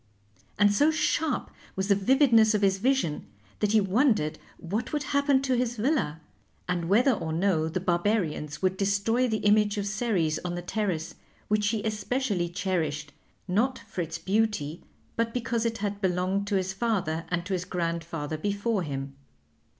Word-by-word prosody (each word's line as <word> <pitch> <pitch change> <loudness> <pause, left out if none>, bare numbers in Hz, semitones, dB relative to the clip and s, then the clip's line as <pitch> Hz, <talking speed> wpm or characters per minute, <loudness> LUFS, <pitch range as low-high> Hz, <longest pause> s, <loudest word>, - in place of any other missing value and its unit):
And 205 -1 +5
so 290 +9 +4
sharp 315 -2 0 0.2
was 190 0 -1
the 205 - +5
vividness 225 0 +4
of 205 - 0
his 195 -1 +3
vision 250 - 0 0.3
that 210 0 +1
he 220 - +6
wondered 205 - +2 0.2
what 210 +7 -3
would 295 -1 -1
happen 280 0 +2
to 260 -1 +1
his 240 -1 -1
villa, 215 - 0 0.5
and 175 -2 -1
whether 240 +7 +5
or 165 -9 -2
no 160 -2 +1
the 160 - -2
Barbarians 175 -4 -1
would 185 0 +1
destroy 200 +6 +1
the 220 -3 -2
image 210 0 +4
of 200 - -1
Ceres 200 -7 0
on 175 -1 -3
the 175 - -5
terrace, 180 -5 -2 0.4
which 210 0 +2
he 215 -1 -1
especially 210 -3 -1
cherished, 160 -6 -2 0.3
not 235 +8 +1
for 185 - -6
its 165 -1 -4
beauty 195 -7 -1 0.3
but 230 0 -1
because 235 -1 0
it 225 0 -3
had 205 -1 -3
belonged 190 +2 0
to 205 - 0
his 190 0 0
father 190 -7 -1
and 175 -1 -1
to 195 - -3
his 180 -2 -1
grandfather 165 -4 -3
before 205 +3 -1
him. 135 -3 -5
200 Hz, 165 wpm, -27 LUFS, 175-225 Hz, 0.5 s, he